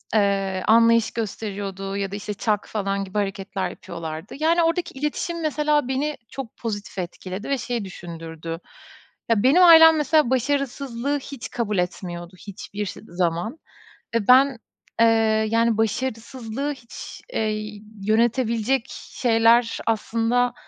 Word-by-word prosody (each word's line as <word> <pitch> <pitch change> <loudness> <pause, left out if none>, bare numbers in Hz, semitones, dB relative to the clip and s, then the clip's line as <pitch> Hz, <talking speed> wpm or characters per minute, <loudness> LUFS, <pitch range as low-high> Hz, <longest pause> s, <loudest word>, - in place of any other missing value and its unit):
eee, 195 -2 +1
anlayış 230 0 +5
gösteriyordu 200 -3 -4
ya 195 -1 -2
da, - - -4
işte, 210 0 -4
çak, 210 +1 -1
falan, 200 -2 -2
gibi 190 +2 -6
hareketler 195 -1 -2
yapıyorlardı. 165 +1 -7
Yani, 335 +2 +3
oradaki 335 +2 0
iletişim 330 +3 -2
mesela 300 -2 +1
beni 285 +3 -1
çok 265 -5 -8
pozitif 205 -4 -5
etkiledi 185 +4 -6
ve 275 - +1
şey 240 -2 -3
düşündürdü, 165 -2 -7 0.7
ya, 225 -3 +3
benim 295 +8 +6
ailem 325 -2 +9
mesela 300 -2 +3
başarısızlığı 275 0 -1
hiç 260 -4 -8
kabul 215 -4 -2
etmiyordu 175 0 -4
hiçbir 205 +1 -6
ş 185 - -7
zaman 175 - -1 0.6
ve 220 -3 0
ben, 260 0 +6 0.4
eee, 230 - +7 0.4
yani, 230 0 +2
başarısızlığı 230 +3 -2
hiç, 245 -4 -10
eee, 215 -1 -2 0.3
yönetebilecek 235 +2 +2
şeyler 230 -1 +2
aslında 230 +2 +1
225 Hz, 125 wpm, -23 LUFS, 200-260 Hz, 0.7 s, ailem